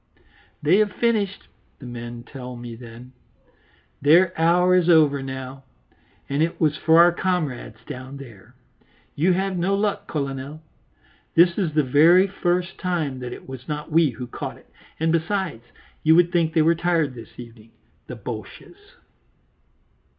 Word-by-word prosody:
"They 165 +6 +4
have 210 -2 +2
finished," 210 -3 -1 0.3
the 130 - -12
men 120 -1 -8
tell 125 -1 -9
me 120 -1 -8
then; 120 +2 -12 0.9
"their 170 +6 +5
hour 175 +3 +3
is 180 -1 +3
over 150 -4 +4
now, 130 0 -7 0.6
and 140 +2 -1
it 165 +1 -1
was 155 -3 +2
for 160 +1 +3
our 175 +1 +7
comrades 155 - -2
down 130 +2 -8
there. 115 -8 -14 0.6
You 175 +5 +2
have 190 0 -1
no 190 +3 +1
luck, 205 0 -1
Colonel; 140 +1 -5 0.7
this 170 +1 +5
is 170 -7 -2
the 150 - +4
very 160 +8 +5
first 180 -1 -2
time 160 -8 -2
that 125 -1 -6
it - - -10
was 130 -1 -9
not 150 +1 -5
we 160 -1 +4
who 125 0 -7
caught 120 - -7
it, - - -23 0.3
and, 160 0 +1
besides, 170 - -2 0.4
you 160 +1 +5
would 175 0 +4
think 165 -2 +1
they 160 - +4
were 165 +2 +4
tired 165 -4 0
this 115 -2 -13
evening, 115 -2 -12 0.4
the - - -7
Boches." - - -10
155 Hz, 155 wpm, -23 LUFS, 130-175 Hz, 0.9 s, our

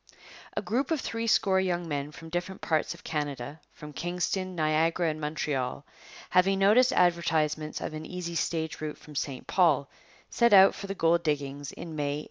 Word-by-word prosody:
A - - 0
group 255 +5 -1
of 320 -3 +1
threescore 230 -5 +1
young 175 -2 -1
men 145 -1 -3
from 165 +2 -11
different 175 +3 -4
parts 160 +1 0
of - - -17
Canada, 145 -2 -4
from 150 0 -11
Kingston, 180 +3 -2
Niagara, 160 +2 +1
and 155 0 -7
Montreal, 145 -3 -2 0.5
having 190 +2 +4
noticed 220 +7 +5
advertisements 160 - +1
of - - -4
an 155 0 -6
easy 180 -2 -5
stage 160 -1 -2
route 155 -1 -4
from 150 - -14
St 140 -2 -4
Paul, 155 -7 +2 0.4
set 235 -2 +3
out 195 0 +8
for 200 - -7
the 195 - -4
gold 170 -1 +3
diggings 145 -3 -2
in 165 -2 -8
May 145 -1 -1
1862. - - -4
165 Hz, 175 wpm, -28 LUFS, 150-185 Hz, 0.5 s, out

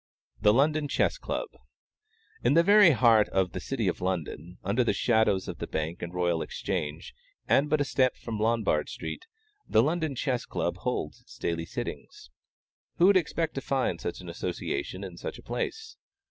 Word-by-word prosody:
THE 105 0 +6
LONDON 145 +5 +2
CHESS 320 - +1
CLUB. - - -3 0.9
In - - +3
the 170 - +6
very 205 0 +7
heart 115 -6 +5
of 95 -2 +1
the - - -4
City 115 +1 -2
of 90 - -1
London, 90 -1 -3
under 105 +7 +2
the - - +1
shadows 110 -5 +2
of - - -6
the - - -4
Bank 80 +2 -3
and 85 - -5
Royal 90 -2 0
Exchange, 80 -6 -4 0.3
and 145 +2 +3
but 155 0 +2
a - - +1
step 130 -2 +2
from 110 -2 -5
Lombard 110 -9 +1
street, 365 - -6 0.4
the 110 - +5
London 160 -1 0
Chess 125 -1 -1
Club - - -2
holds - - -3
its - - -16
daily 85 -1 -2
sittings. 65 - -7 0.7
Who 175 - +5
would 200 +1 +6
expect 165 -1 -1
to 135 - -4
find 130 -11 -1
such 85 - -4
an 90 - -11
association 90 +1 -4
in 90 -3 -8
such - - -6
a - - -14
place? 445 - -4
110 Hz, 180 wpm, -28 LUFS, 90-145 Hz, 0.9 s, very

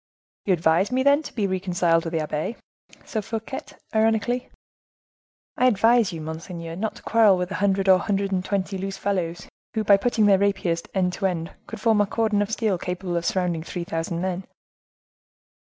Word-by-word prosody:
"You 195 - +3
advise 165 +5 +2
me, 260 +1 +1
then, 280 +2 +5
to 310 - -9
be 215 -4 0
reconciled 180 -3 +1
to 165 - -4
the 165 -1 -1
abbe?" 155 +8 -3 0.5
said 220 -2 -3
Fouquet, 225 +5 -4 0.3
ironically. 225 +2 +1 1.1
"I 255 - +4
advise 230 -1 +4
you, 165 -2 -6
monseigneur, 165 +1 -6
not 215 +4 -3
to - - -14
quarrel 215 -4 +5
with 180 +1 -3
a 200 - -3
hundred 195 -1 +2
or 190 -1 +7
a - - -6
hundred 200 -1 0
and 185 -1 0
twenty 195 0 -2
loose 195 0 -4
fellows, 180 -4 -2 0.3
who, 220 - +1
by 200 -1 +6
putting 220 +1 +1
their 195 -2 +5
rapiers 190 -4 +1
end 180 -1 +1
to 195 - 0
end, 165 -2 -4 0.2
would - - -7
form 220 -2 +3
a 205 - +1
cordon 220 -1 +1
of 205 - -1
steel 220 -5 0
capable 180 0 -3
of 170 0 -1
surrounding 180 -3 0
three 170 +2 -5
thousand 165 0 -3
men." 185 0 -2
195 Hz, 190 wpm, -24 LUFS, 175-215 Hz, 1.1 s, or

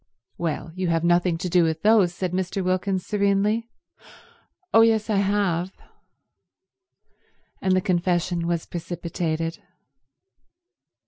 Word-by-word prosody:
"Well, 165 -1 -3
you 185 0 -2
have 165 -1 +1
nothing 175 0 +2
to 180 - -4
do 180 0 +3
with 160 -1 -1
those," 210 -4 +5
said 180 0 -3
Mr. 185 +1 -2
Wilkins 185 0 -1
serenely. 210 +3 +1 1.0
"Oh 225 - +7
yes, 225 -1 +3
I 205 - +2
have—" 195 -3 0 1.9
And 190 -1 +2
the 185 - +2
confession 175 -2 0
was 170 -1 -1
precipitated. 165 -1 -4
180 Hz, 115 wpm, -24 LUFS, 170-200 Hz, 1.9 s, Oh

